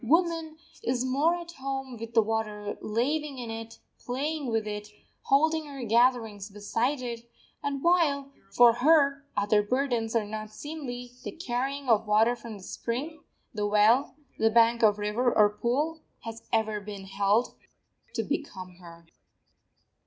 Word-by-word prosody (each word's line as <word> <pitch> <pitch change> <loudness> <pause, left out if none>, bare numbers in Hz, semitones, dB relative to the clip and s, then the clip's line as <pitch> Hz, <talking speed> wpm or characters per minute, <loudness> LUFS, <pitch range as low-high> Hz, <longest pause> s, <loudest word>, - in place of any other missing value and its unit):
Woman 325 +3 +1 0.2
is 250 +1 0
more 285 +7 +2
at 345 -1 -7
home 270 -3 -5
with 230 0 -8
the 225 - +6
water, 210 -1 -2
laving 275 +6 -1
in 240 -2 -5
it, 225 0 -7 0.2
playing 285 +3 -3
with 225 -2 0
it, 210 0 -5 0.4
holding 315 +3 +3
her 275 -3 -7
gatherings 225 -3 +2
beside 230 +7 -1
it; 235 -1 -6 0.3
and 280 -1 -3
while, 300 -6 +2 0.2
for 235 +4 +6
her, 280 +2 +4
other 205 +1 +3
burdens 240 0 -1
are 225 -2 +2
not 215 0 -6
seemly, 245 -2 -7
the - - -4
carrying 275 -2 -3
of 225 -2 +3
water 220 +3 +4
from 230 -3 -9
the 190 - -13
spring, 280 - -4 0.3
the 210 -2 -1
well, 215 +7 +4 0.2
the 225 - +4
bank 230 +1 +4
of 210 -2 +5
river 210 +4 +1
or 210 -1 +7
pool, 290 +9 -1 0.2
has 225 0 -7
ever 220 -1 +1
been 200 -1 -8
held 200 +4 +1 0.6
to - - 0
become 185 - -5
her. 170 -2 -14
235 Hz, 150 wpm, -28 LUFS, 215-275 Hz, 0.6 s, or